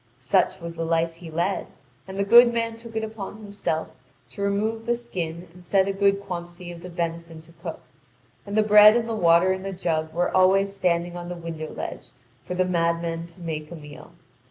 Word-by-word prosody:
Such 125 Hz, +9 st, +1 dB
was 170 Hz, -1 st, -6 dB
the 165 Hz, 0 st, -4 dB
life 165 Hz, 0 st, 0 dB
he 170 Hz, -1 st, -10 dB
led; 175 Hz, +5 st, -1 dB, 0.4 s
and 190 Hz, 0 st, -7 dB
the 200 Hz, -, +2 dB
good 235 Hz, +4 st, +8 dB
man 230 Hz, -1 st, -1 dB
took 230 Hz, 0 st, -11 dB
it 220 Hz, -, -1 dB
upon 215 Hz, -2 st, -6 dB
himself 200 Hz, -7 st, -3 dB, 0.4 s
to -, -, -9 dB
remove 215 Hz, +3 st, -1 dB
the 240 Hz, -, +3 dB
skin 180 Hz, -8 st, -5 dB
and 180 Hz, 0 st, -15 dB
set 190 Hz, +2 st, +2 dB
a 195 Hz, -, 0 dB
good 200 Hz, 0 st, +2 dB
quantity 175 Hz, -2 st, -7 dB
of 170 Hz, -1 st, -10 dB
the 180 Hz, -, -8 dB
venison 170 Hz, -1 st, -4 dB
to 160 Hz, +1 st, -19 dB
cook; 170 Hz, -2 st, -6 dB, 0.6 s
and 205 Hz, +1 st, -4 dB
the 215 Hz, -, +5 dB
bread 210 Hz, +1 st, +8 dB
and 230 Hz, -1 st, -1 dB
the 230 Hz, -, -2 dB
water 175 Hz, -2 st, +4 dB
in 190 Hz, -, -5 dB
the 195 Hz, +1 st, -4 dB
jug 160 Hz, -3 st, -2 dB
was 175 Hz, +2 st, 0 dB
always 195 Hz, +1 st, +4 dB
standing 175 Hz, -2 st, 0 dB
on 175 Hz, 0 st, -6 dB
the 180 Hz, -, -4 dB
window 165 Hz, -2 st, -6 dB
ledge -, -, -7 dB, 0.4 s
for 180 Hz, -, -3 dB
the 185 Hz, 0 st, +2 dB
madman 170 Hz, -1 st, -1 dB
to 170 Hz, +2 st, -19 dB
make 155 Hz, -2 st, -4 dB
a 170 Hz, -, -8 dB
meal. 150 Hz, -3 st, -12 dB
180 Hz, 210 wpm, -25 LUFS, 165-200 Hz, 0.6 s, good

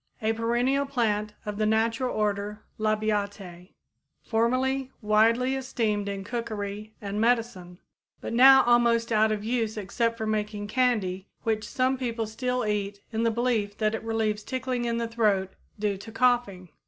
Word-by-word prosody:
a 220 Hz, -1 st, 0 dB
perennial 240 Hz, +5 st, +1 dB
plant 215 Hz, -6 st, -1 dB
of 210 Hz, -1 st, -4 dB
the 215 Hz, -, +2 dB
natural 225 Hz, +3 st, +1 dB
order 210 Hz, 0 st, -2 dB, 0.2 s
Labiatæ, 205 Hz, -4 st, -2 dB, 0.5 s
formerly 255 Hz, +3 st, 0 dB
widely 230 Hz, +4 st, +3 dB
esteemed 220 Hz, -6 st, -1 dB
in 195 Hz, -1 st, -4 dB
cookery 215 Hz, -2 st, -5 dB
and 205 Hz, +1 st, -3 dB
medicine, 225 Hz, -7 st, 0 dB, 0.4 s
but -, -, -5 dB
now 265 Hz, +2 st, +8 dB
almost 235 Hz, -1 st, +3 dB
out 220 Hz, 0 st, +3 dB
of 210 Hz, -1 st, -2 dB
use 225 Hz, -1 st, -1 dB
except 230 Hz, +3 st, -1 dB
for 220 Hz, -, -3 dB
making 210 Hz, -1 st, -2 dB
candy 205 Hz, -5 st, 0 dB, 0.2 s
which 220 Hz, -1 st, -1 dB
some 260 Hz, -1 st, 0 dB
people 230 Hz, -3 st, -2 dB
still 250 Hz, +2 st, -2 dB
eat 205 Hz, -1 st, -2 dB
in 220 Hz, -, 0 dB
the 230 Hz, -, +3 dB
belief 225 Hz, -3 st, -1 dB
that 215 Hz, -1 st, +1 dB
it 225 Hz, -, -3 dB
relieves 220 Hz, -2 st, -1 dB
tickling 255 Hz, 0 st, -3 dB
in 235 Hz, -1 st, -1 dB
the 235 Hz, 0 st, -1 dB
throat 210 Hz, -5 st, +1 dB, 0.2 s
due 205 Hz, -1 st, -1 dB
to 215 Hz, +3 st, -10 dB
coughing. 225 Hz, -7 st, +1 dB
220 Hz, 155 wpm, -27 LUFS, 210-240 Hz, 0.5 s, now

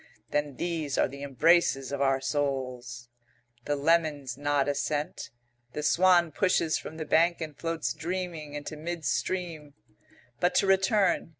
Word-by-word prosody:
"Then 145 Hz, -2 st, -1 dB
these 160 Hz, -5 st, -2 dB
are -, -, +3 dB
the 140 Hz, +1 st, -10 dB
embraces 140 Hz, 0 st, +2 dB
of 140 Hz, -1 st, -3 dB
our 135 Hz, -1 st, +3 dB
souls." 130 Hz, -3 st, -3 dB, 0.6 s
The 145 Hz, -, 0 dB
lemons 145 Hz, -4 st, +1 dB
nod 145 Hz, 0 st, 0 dB
assent. 145 Hz, +1 st, -2 dB, 0.4 s
The 150 Hz, -, -4 dB
swan 175 Hz, +2 st, +4 dB
pushes 170 Hz, -1 st, +1 dB
from 160 Hz, -, -9 dB
the 155 Hz, -, -4 dB
bank 170 Hz, +3 st, +3 dB
and 155 Hz, -3 st, -6 dB
floats 165 Hz, 0 st, -2 dB
dreaming 170 Hz, -4 st, -4 dB
into 145 Hz, +1 st, -6 dB
mid 165 Hz, +1 st, -5 dB
stream. 165 Hz, -6 st, -2 dB, 0.6 s
"But 180 Hz, -, +1 dB
to -, -, +4 dB
return. 195 Hz, -2 st, +2 dB
150 Hz, 140 wpm, -28 LUFS, 140-170 Hz, 0.6 s, swan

